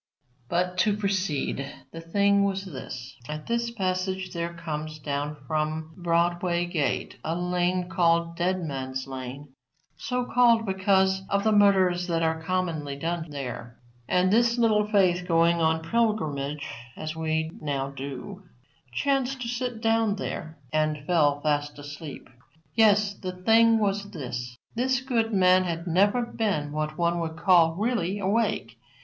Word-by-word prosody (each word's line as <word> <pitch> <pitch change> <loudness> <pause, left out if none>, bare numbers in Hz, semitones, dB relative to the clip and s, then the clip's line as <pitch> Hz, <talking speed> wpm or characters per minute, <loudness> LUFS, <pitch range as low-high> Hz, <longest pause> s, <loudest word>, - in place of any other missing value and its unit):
But, 180 +1 0
to 205 +1 +3
proceed, 185 -9 -1 0.2
the 165 - -8
thing 200 +4 +3
was 195 0 -1
this. 130 -5 -8
At 150 0 -5
this 235 0 0
passage 185 -3 -2
there 170 0 -2
comes 155 -2 -5
down 145 0 -3
from 155 +2 -2
Broadway 175 0 +1
gate 165 -5 -2
a 160 +1 -1
lane 180 0 0
called 170 -1 +2
Dead 180 +1 0
Man's 130 -3 -4
lane, 135 +2 -7 0.5
so 250 -1 -2
called 235 -2 +4
because 190 0 +2
of 200 0 +1
the 220 - +3
murders 190 -4 +4
that 165 -1 0
are 160 0 0
commonly 160 -5 -2
done 165 +2 -3
there. 125 -4 -6 0.3
And 185 +2 +3
this 235 +1 +3
Little 215 -3 +3
Faith 180 -4 +2
going 170 0 +4
on 160 0 +2
pilgrimage, 150 -11 0 0.3
as 155 0 -5
we 160 0 -1
now 140 -2 -2
do, 140 +8 -7 0.5
chanced 270 - 0
to - - -4
sit 245 -1 -3
down 225 -2 +2
there 160 -5 -5 0.2
and 155 -1 0
fell 145 -4 +2
fast 145 -1 0
asleep. 145 +1 -8 0.5
Yes; 210 -2 +4
the 185 -2 -6
thing 225 +5 +4
was 200 -1 0
this: 120 - -6 0.2
This 255 +2 +1
good 235 -4 0
man 185 -2 +4
had 170 -1 -3
never 200 +7 +3
been 200 -11 -1
what 155 0 -3
one 170 0 +1
would 160 -1 -4
call 170 -2 +4
really 205 -2 0
awake. 195 - -1
175 Hz, 145 wpm, -26 LUFS, 155-200 Hz, 0.5 s, called